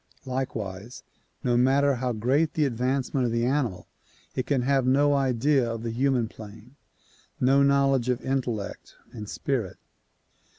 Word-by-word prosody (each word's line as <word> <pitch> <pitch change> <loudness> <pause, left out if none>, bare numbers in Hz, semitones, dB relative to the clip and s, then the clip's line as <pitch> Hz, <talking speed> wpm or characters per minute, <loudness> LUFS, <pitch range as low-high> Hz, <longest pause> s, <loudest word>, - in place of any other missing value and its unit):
Likewise 115 -5 -5 0.4
no 120 -1 +1
matter 135 +3 +3
how 125 0 -2
great 130 +8 +1
the 155 - +2
advancement 130 +1 0
of - - -2
the 115 +1 0
animal 125 -8 -1 0.5
it 130 - -3
can 135 -4 +1
have 135 0 +2
no 145 +2 +4
idea 135 -1 +2
of 115 0 -6
the 115 - -3
human 125 -1 +1
plane; 110 +4 -13 0.6
no 135 +2 +4
knowledge 135 -2 +3
of 125 -1 +1
intellect 125 -6 -3 0.2
and 105 -3 -8
spirit. 120 -10 -2
125 Hz, 140 wpm, -26 LUFS, 115-140 Hz, 0.6 s, no